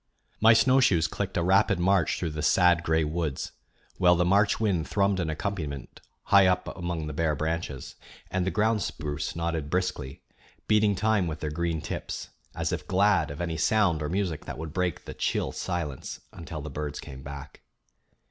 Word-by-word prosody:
My 115 +1 +7
snowshoes 115 -8 +4
clicked 95 +3 -3
a 85 - +1
rapid 95 +1 +4
march 95 0 +2
through 85 -3 -2
the 75 0 -4
sad 85 +2 +4
gray 80 -1 +1
woods, 80 -2 -2 0.5
while 90 -1 +6
the 90 0 +2
March 100 +3 +3
wind 95 -7 0
thrummed 100 -1 +2
an 85 -3 -1
accompaniment 75 -5 -4 0.2
high 100 -1 +6
up 90 0 0
among 85 -3 -3
the 75 - -5
bare 80 0 0
branches, 80 -3 -3 0.4
and 95 -1 0
the 95 - 0
ground 110 +1 +1
spruce 75 -2 -4
nodded 85 -3 -2
briskly, 90 -7 -2 0.4
beating 105 -1 +3
time 105 -2 +1
with 80 -1 -4
their 75 -1 -3
green 85 0 -1
tips, - - -5 0.3
as - - -1
if - - -4
glad 95 -4 +3
of 75 +3 -6
any 85 -2 -2
sound 90 -2 +2
or 75 - -2
music 90 -3 -2
that - - -6
would 80 -1 -6
break 90 -3 -1
the - - -7
chill - - -1
silence 85 -7 -4
until 80 -2 -7
the 75 +1 -7
birds 75 0 -4
came 65 -1 -9
back. 70 +1 -9
85 Hz, 180 wpm, -27 LUFS, 75-95 Hz, 0.5 s, My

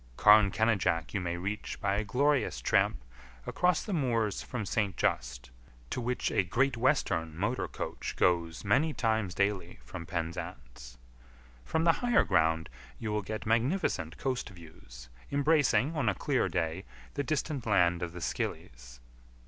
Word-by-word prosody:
Carn 105 -1 +7
Kenidjack 95 -8 +1
you 100 - -1
may 85 -1 -2
reach 100 +4 -4
by 95 - 0
a 105 +2 0
glorious 140 +5 +1
tramp - - +1 0.4
across 180 -2 +1
the 210 - -4
moors 115 - 0
from 125 -5 -5
St. 100 0 -1
Just, - - -1 0.4
to - - -2
which 125 +1 -1
a - - +3
Great 130 +9 +1
Western 100 - 0
motor 110 +8 -1
coach - - -5
goes 85 0 +1
many 135 +10 +2
times 110 -6 0
daily 100 -1 -1
from 85 +7 -8
Penzance. 60 -8 -6 0.7
From 160 - 0
the 165 - +6
higher 245 -1 +4
ground 80 0 +2 0.3
you 110 -2 -4
will 105 0 0
get 110 +2 -5
magnificent 115 - 0
coast 130 -2 -2
views, 60 -10 -13 0.2
embracing, 145 -2 +2
on 135 -8 +1
a 100 - 0
clear - - 0
day, 80 -2 -2 0.3
the - - -1
distant 140 -3 -2
land 90 -4 +3
of 85 -1 -4
the 90 - -8
Scillies. - - -5
105 Hz, 150 wpm, -30 LUFS, 85-125 Hz, 0.7 s, Carn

